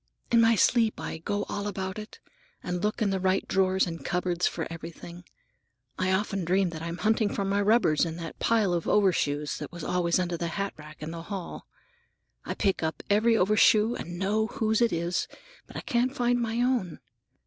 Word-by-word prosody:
In 230 -1 +6
my 230 0 +5
sleep 225 +1 +3
I 160 - -5
go 205 +5 -2
all 205 0 -4
about 190 0 -4
it, 215 - -10 0.5
and 180 0 -3
look 210 +1 0
in 200 - +1
the 190 - 0
right 190 +1 +1
drawers 190 0 +2
and 165 -5 -6
cupboards 180 +1 0
for 165 - -3
everything. 170 +1 -9 0.7
I 185 0 +1
often 195 0 0
dream 185 +1 +1
that 160 -1 -7
I'm 170 +1 -4
hunting 215 +1 +2
for 200 - -2
my 200 +1 +1
rubbers 205 -8 +3
in 165 -2 -2
that 165 -1 -8
pile 215 -5 +2
of 170 -2 -2
overshoes 150 -7 +1
that - - -7
was 175 -2 -8
always 170 -1 +1
under 175 -2 -1
the 170 - -2
hatrack 155 -4 -6
in 155 - -5
the 165 0 -6
hall. 185 0 -7 0.8
I - - -3
pick 195 -3 0
up 160 0 -3
every 225 +3 +4
overshoe 215 +3 +4
and 175 -5 -6
know 210 +4 +1
whose 220 0 0
it 235 - +4
is, 170 +1 -1 0.4
but - - -15
I - - -4
can't 250 +3 0
find 245 0 +1
my 230 +1 -1
own. 245 -10 0
190 Hz, 195 wpm, -27 LUFS, 170-215 Hz, 0.8 s, In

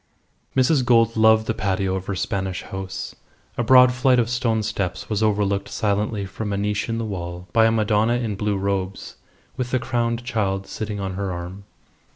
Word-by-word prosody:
Mrs. 130 +1 +3
Gould 115 -2 +3
loved 110 0 +5
the 115 - 0
patio 95 -2 -1
of 95 0 -4
her 100 - -2
Spanish 95 0 -2
house. 95 0 -6 0.4
A - - -1
broad 125 +1 +7
flight 125 0 +3
of 120 -1 +1
stone 115 -3 0
steps 100 -4 -3
was 105 0 0
overlooked 100 -2 +1
silently 105 0 -1
from 105 +2 -5
a 100 - -1
niche 105 +2 -1
in 115 - -1
the 115 - -2
wall 90 -3 -6
by 115 -2 +5
a - - +3
Madonna 110 +1 +2
in 120 -3 -1
blue 105 0 -1
robes 95 -1 -3 0.4
with 125 -1 -2
the 130 - +1
crowned 120 -1 -1
child 95 -6 -1
sitting 105 0 -5
on 95 -1 -3
her 95 0 -3
arm. 90 +3 -7
105 Hz, 190 wpm, -22 LUFS, 95-115 Hz, 0.4 s, broad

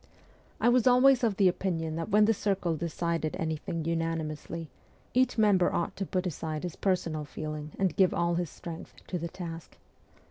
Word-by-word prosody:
I 230 - +2
was 245 0 +4
always 255 +1 +6
of 215 -5 +1
the 195 - +5
opinion 165 -3 -1
that 165 +3 -3
when 210 +1 +5
the 225 - +4
circle 195 -5 0
decided 165 0 -2
anything 160 0 -3
unanimously, 165 0 -3 0.5
each 255 -1 +2
member 205 -5 +4
ought 170 - -1
to 195 - -3
put 185 0 -1
aside 155 -2 -3
his 175 -3 -4
per 190 -2 +2
sonal 155 -4 -5
feeling 155 +2 -6
and 190 -4 +1
give 190 -2 +4
all 170 0 +1
his 175 -1 -1
strength 165 +1 -9
to 180 - -3
the 170 +1 -4
task. 165 -2 -8
170 Hz, 180 wpm, -29 LUFS, 160-195 Hz, 0.5 s, always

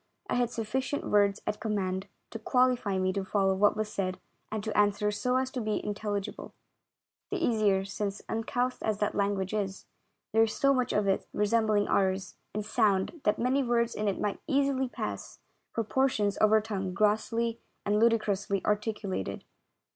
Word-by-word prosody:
I - - +2
had 245 -1 +2
sufficient 245 +5 -2
words 205 -1 +3
at 210 - -2
command 195 -4 -2 0.2
to - - -6
qualify 250 -6 +2
me 185 0 +1
to 195 0 -1
follow 195 0 +2
what 205 +2 +3
was 215 0 -1
said 185 -2 -2 0.3
and 215 -1 -3
to 220 - -3
answer 210 0 +3
so 250 +4 0
as 260 0 0
to 255 - -3
be 215 -1 0
intelligible; 205 -1 -4 0.7
the 395 - -1
easier 215 - +2
since, 200 0 -4
uncouth 245 +3 -1
as 215 -2 0
that 210 0 0
language 200 -1 0
is, 195 -2 -2 0.5
there 225 - +5
is 225 -1 +2
so 275 0 +4
much 255 -2 0
of 205 -1 +1
it 195 - +1
resembling 210 -1 +2
ours 190 -1 +1 0.2
in 210 - -1
sound 215 - +1
that 210 - +3
many 255 +3 +2
words 235 -2 +1
in 210 - -2
it 195 - 0
might 205 -1 -2
easily 275 -2 +1
pass - - -5 0.3
for 230 - -1
por 265 +5 +2
tions 205 -5 0
of 215 - +3
our 220 0 +5
tongue 195 -4 -3
grossly 225 +3 +1 0.3
and 210 +1 +2
ludicrously 205 -4 +1
articulated. 210 - -2
210 Hz, 175 wpm, -29 LUFS, 200-235 Hz, 0.7 s, there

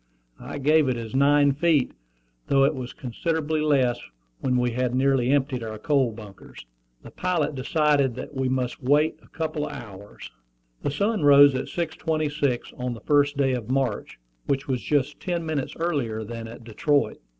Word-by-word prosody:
I - - -7
gave 150 0 +3
it 125 - -1
as 115 -1 -7
nine 145 +1 +4
feet, 145 -1 +2 0.6
though 135 -1 +4
it 140 +3 +3
was 125 -3 -6
considerably 155 +4 -2
less 130 -5 +2 0.4
when 125 -2 0
we 125 0 +1
had 125 +1 -1
nearly 130 -1 +2
emptied 135 -2 +1
our 110 -1 -5
coal 135 +1 +1
bunkers. 105 - -12 0.4
The - - -11
pilot 170 -5 -1
decided 140 -1 +1
that 130 - -7
we 130 -1 -1
must 130 -1 -2
wait 150 +4 +2
a - - -21
couple 155 -1 -3
of 145 - -7
hours. 105 - -10 0.5
The - - -1
sun 205 +8 0
rose 145 -1 +7
at 130 - -2
6.26 155 -5 -2
on 125 -1 -3
the 110 - -12
first 145 +1 +2
day 135 -2 +2
of 120 -3 -4
March, 130 -5 -1 0.3
which 140 +1 -1
was 130 -3 -1
just 145 -1 0
ten 175 -3 -3
minutes 155 -4 -3
earlier 140 -10 -2
than 115 +1 -7
at 115 +1 -11
Detroit. 140 +6 0
135 Hz, 170 wpm, -25 LUFS, 125-150 Hz, 0.6 s, rose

